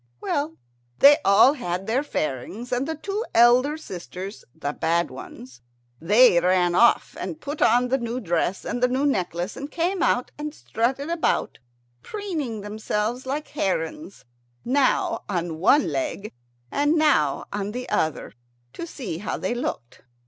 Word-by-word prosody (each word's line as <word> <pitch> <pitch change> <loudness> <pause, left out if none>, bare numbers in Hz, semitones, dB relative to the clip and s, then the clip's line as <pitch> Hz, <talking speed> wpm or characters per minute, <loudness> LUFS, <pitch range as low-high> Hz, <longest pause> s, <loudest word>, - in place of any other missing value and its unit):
Well, 295 - -2 0.4
they 290 +1 +8
all 205 +7 +6
had 185 -8 -4
their 230 +5 +1
fairings, 195 - -4
and 250 +3 0
the 320 - -2
two 395 +7 -3
elder 250 +6 +5
sisters, 190 - -8
the 145 - -4
bad 170 0 0
ones, 130 -1 -11 0.4
they 205 +2 +5
ran 180 -1 +2
off 235 +6 +3
and 315 - -5
put 290 0 -6
on 245 +2 +4
the 265 +2 +1
new 235 +1 -3
dress 175 -1 -1
and 245 - -3
the 250 - +5
new 260 +3 0
necklace, 180 - -1
and 280 +1 -6
came 350 +4 -1
out 245 - +1
and 300 0 -5
strutted 265 +7 -2
about, 340 -1 0 0.4
preening 315 - -4
themselves 215 +4 -3
like 295 +3 -3
herons, 195 - -3 0.4
now 285 - +1
on 170 -4 -2
one 285 - +4
leg 285 -10 -3 0.4
and 290 +2 +2
now 285 - +2
on 205 0 -3
the 250 +3 -5
other, 160 -1 -1 0.4
to 340 - -6
see 200 - -6
how 205 - -3
they - - -2
looked. 120 - -5
240 Hz, 150 wpm, -24 LUFS, 185-290 Hz, 0.4 s, they